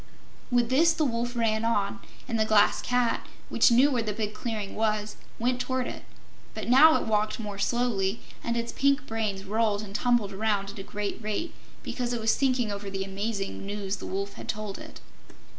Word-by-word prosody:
With 245 -2 +2
this 325 +5 +5
the 315 -1 +1
Wolf 240 -1 -1
ran 225 -2 +1
on, 225 -1 0 0.3
and 230 -3 -1
the - - +5
Glass 215 -1 +4
Cat, 245 -1 0 0.2
which - - +5
knew 255 +5 +5
where 245 -3 +1
the 215 -2 -2
big 210 0 -3
clearing 210 -2 -4
was, 215 -1 -1 0.2
went 250 +2 0
toward 260 -1 -1
it. - - -6 0.5
But - - -5
now 295 +6 +8
it - - -4
walked 215 0 +1
more 205 -3 -5
slowly, 225 -3 0 0.2
and 235 0 -1
its 235 0 -2
pink 280 0 +2
brains 215 -5 -2
rolled 215 0 +1
and 200 -2 -9
tumbled 220 -2 +1
around 200 -1 0
at 205 - -10
a - - -5
great 205 +2 -4
rate 215 +11 -3 0.3
because 245 -1 -2
it 240 - -1
was 220 0 +2
thinking 255 -5 +1
over 200 0 -5
the 195 0 -3
amazing 195 +1 -3
news 200 0 -3
the - - -7
Wolf 200 +1 -3
had - - -10
told 210 -2 -3
it. - - -11
220 Hz, 195 wpm, -27 LUFS, 205-240 Hz, 0.5 s, now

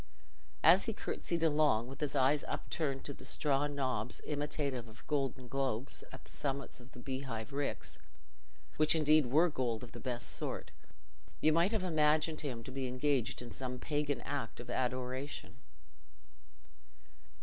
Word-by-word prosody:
As 175 +5 +7
he 225 - -1
curtsied 170 -4 -2
along, 150 -7 +4
with 135 - -9
his 150 -1 -1
eyes 140 +2 +4
upturned 140 -4 -2
to 140 - -4
the - - -13
straw 145 -1 +2
knobs 130 -5 -1
imitative 145 -4 -1
of 115 +2 -14
golden 135 -4 -1
globes 135 -1 -1
at - - -10
the - - -16
summits 140 -2 -3
of 125 +2 -15
the - - -10
beehive 130 -2 -4
ricks, 140 0 -2 0.8
which 155 +1 +5
indeed 155 -2 +5
were 155 +8 +5
gold 125 -5 -1
of 120 - -8
the - - -8
best 125 -2 -2
sort, - - -2 0.7
you 155 - +4
might 170 +5 +4
have 220 -4 +1
imagined 155 -2 +3
him 125 -6 -4
to 130 - -7
be 130 0 -2
engaged 130 -1 0
in 120 - -8
some 125 -1 -4
pagan 145 +1 -1
act 140 -5 -3
of 120 - -6
adoration. 130 +2 -2
140 Hz, 155 wpm, -35 LUFS, 125-150 Hz, 0.8 s, As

